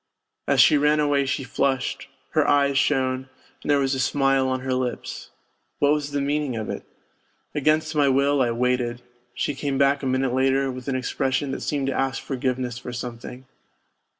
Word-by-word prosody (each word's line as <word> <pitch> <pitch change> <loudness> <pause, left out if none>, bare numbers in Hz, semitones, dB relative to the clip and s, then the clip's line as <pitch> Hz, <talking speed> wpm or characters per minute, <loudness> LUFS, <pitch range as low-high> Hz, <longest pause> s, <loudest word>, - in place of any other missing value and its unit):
As - - +2
she 150 - +6
ran 150 +1 +3
away 145 -2 +2
she 135 - -1
flushed, 130 0 -1 0.2
her - - +2
eyes 140 -1 +3
shone, 130 -2 +1 0.3
and - - -7
there 145 - +5
was 135 -1 +1
a 135 - -2
smile 135 0 +2
on 130 0 -1
her 130 0 -2
lips 130 -1 -4 0.5
what 145 0 +3
was 150 -1 -2
the 145 0 -2
meaning 145 -2 -1
of 110 -1 -3
it? - - -5 0.7
Against 155 +2 +1
my 145 -2 +3
will 140 +1 +3
I 120 - +2
waited: 120 0 -1 0.3
she 145 - -1
came 140 0 -2
back 140 0 +3
a 135 - -2
minute 130 -1 0
later 135 +1 +2
with 130 0 -9
an 135 - -1
expression 130 +2 -1
that - - -4
seemed 140 -2 -1
to 135 - -1
ask 135 0 -1
forgiveness 125 -2 -3
for 125 - -7
something. 120 +1 -7
135 Hz, 185 wpm, -24 LUFS, 130-145 Hz, 0.7 s, she